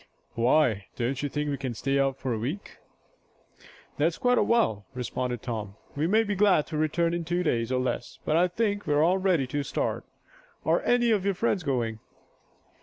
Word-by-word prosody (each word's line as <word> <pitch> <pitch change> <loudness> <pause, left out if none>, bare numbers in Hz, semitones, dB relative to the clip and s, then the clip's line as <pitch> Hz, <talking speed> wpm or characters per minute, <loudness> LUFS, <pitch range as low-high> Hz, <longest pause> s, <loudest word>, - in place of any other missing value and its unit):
"Why, 115 -5 +2
don't 125 +3 -2
you 145 - -2
think 150 +1 -2
we 140 - -2
can 130 -3 -4
stay 135 +5 0
out 135 -1 +1
a - - +1
week?" 125 - -4 1.2
"That's 160 +3 +1
quite 245 0 +3
a - - +4
while," 110 - +1
responded 125 -1 -3
Tom. 110 -5 -4 0.2
"We 150 +3 0
may 220 +5 +4
be 205 -2 -2
glad 195 -6 +4
to - - -6
return 165 +2 +1
in 170 0 -2
two 175 +2 -1
days, 120 -6 0
or 130 - +1
less. 125 -1 -3
But 155 - +1
I 175 +2 +4
think 205 +1 -1
we're 150 0 +3
all 180 +3 +3
ready 185 -7 +2
to 145 +3 -2
start. 135 -1 -2 0.6
Are - - +3
any 240 -1 +3
of 205 -4 +2
your 200 -1 0
friends 205 -1 0
going?" 120 -7 -1
150 Hz, 190 wpm, -27 LUFS, 125-180 Hz, 1.2 s, a